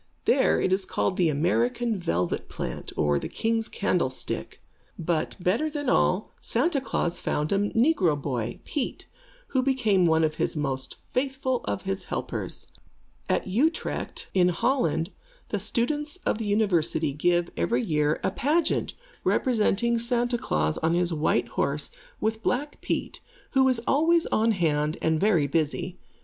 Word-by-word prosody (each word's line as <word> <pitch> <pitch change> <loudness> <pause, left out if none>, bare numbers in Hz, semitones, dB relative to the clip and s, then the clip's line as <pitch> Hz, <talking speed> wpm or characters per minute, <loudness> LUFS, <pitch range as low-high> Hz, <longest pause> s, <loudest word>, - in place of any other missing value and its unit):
There - - +4
it 185 - +2
is 190 +1 +1
called 185 - -1
the 175 -3 +3
American 230 - +1
Velvet 90 - -1
Plant, - - -5
or 75 -2 +2
the - - -5
King's 225 0 0
Candlestick. 170 -10 -2 0.4
But, 165 -1 -1
better 210 - +1
than 290 -3 -2
all, 185 +4 +2
Santa 275 +4 +1
Klaas 175 -9 -1
found 150 +1 -1
a 200 - +3
negro 225 - +3
boy, 120 -5 -3
Pete, 280 -4 -3 0.4
who 260 - +2
became 225 -9 +3
one 160 0 +3
of 155 0 0
the - - 0
most 135 -3 -2 0.2
faithful 260 -1 0
of - - -2
his 195 0 -3
helpers. - - -4 0.6
At - - +1
Utrecht, 265 - -1
in 180 -2 +4
Holland, 170 - +1 0.4
the - - -1
students 295 +7 0
of - - +1
the 220 - -3
University 175 -8 +1
give, 175 +3 +1
every 120 +9 +1
year, 150 -1 +1
a 190 - +1
pageant 305 - 0 0.3
representing 235 -1 +2
Santa 240 0 +1
Klaas 75 - 0
on 165 +1 +1
his 175 -1 +2
white 155 -1 +1
horse, - - -1 0.3
with 220 0 -1
Black 285 +6 -2
Pete, - - -2 0.3
who 265 -1 +4
is 255 -3 +3
always 325 +3 +3
on 225 +1 +3
hand 155 -4 0
and 160 -1 +1
very 190 -7 +3
busy. 160 +5 -1
190 Hz, 150 wpm, -26 LUFS, 160-245 Hz, 0.6 s, There